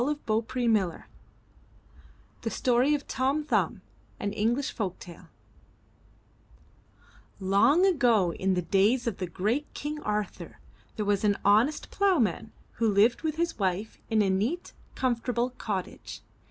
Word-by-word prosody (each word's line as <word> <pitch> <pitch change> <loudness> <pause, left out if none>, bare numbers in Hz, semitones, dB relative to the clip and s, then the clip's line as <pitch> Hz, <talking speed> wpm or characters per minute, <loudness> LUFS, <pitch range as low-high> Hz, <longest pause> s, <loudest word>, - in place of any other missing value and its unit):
261 245 -3 0
MY 215 - +5
BOOK 180 -3 -3
HOUSE - - -14 1.4
THE 225 - -2
STORY 250 +5 +2
OF 290 - -6
TOM 275 +4 0
THUMB 210 - 0 0.4
An 205 0 -2
English 240 +7 0
Folk 195 -5 -3
Tale 175 -2 -12 2.1
Long 205 - +4
ago 240 - +3
in 190 0 0
the 180 - -1
days 205 +8 +2
of 230 -5 -2
the 185 - -3
great 215 - -2
King 300 +1 -4
Arthur, 210 -3 -4 0.4
there 215 - -2
was 205 0 +1
an 205 -1 +2
honest 220 +9 +3
plough 395 -3 +2
man 220 - -1 0.3
who 225 -1 +2
lived 210 +4 +3
with 315 -2 -2
his 335 -5 -2
wife 195 +2 -2
in 220 -2 +3
a 195 - +1
neat, 230 - -2 0.2
comfortable 245 0 -1
cottage. 205 -7 -5
225 Hz, 140 wpm, -28 LUFS, 200-265 Hz, 2.1 s, MY